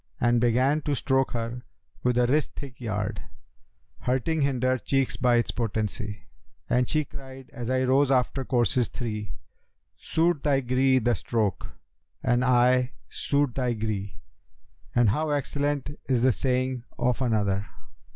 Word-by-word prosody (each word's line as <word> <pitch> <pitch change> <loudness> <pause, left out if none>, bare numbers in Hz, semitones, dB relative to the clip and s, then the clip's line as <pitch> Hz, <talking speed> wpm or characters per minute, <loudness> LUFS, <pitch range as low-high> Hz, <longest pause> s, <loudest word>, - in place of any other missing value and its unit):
And 120 -1 +3
began 130 +5 +3
to 145 -1 -1
stroke 135 0 +1
her 120 +1 -3 0.4
with 125 -1 +1
wrist 130 +4 +2
thick 135 -4 -9
yard, 105 -2 -2 0.4
* - - -42
Hurting 130 +5 +1
hinder 130 -2 +1
cheeks 135 0 0
by 125 -1 +3
its 120 - +1
potency: 105 -2 -3 0.4
And 125 0 +1
she 155 -1 +1
cried 135 -1 -11
as 120 -3 -5
I 130 0 +2
rose 135 +2 +3
after 135 0 +1
courses 120 -2 +1
three 105 -3 -5 0.3
* - - -50
'Suit 165 -2 +1
thy 140 -2 +2
gree 130 +1 +3
the 120 -1 +2
stroke!' 110 -1 -1 0.6
and 120 +1 +2
I—'suit 125 +2 +1
thy 125 -2 0
gree!' 105 -3 -3 0.8
And 120 -3 +5
how 155 +6 -1
excellent 145 0 -1 0.2
is 125 -2 +2
the 130 - +5
saying 130 +1 -1
of 125 +1 0
another! 105 -4 +1
125 Hz, 140 wpm, -26 LUFS, 115-135 Hz, 0.8 s, And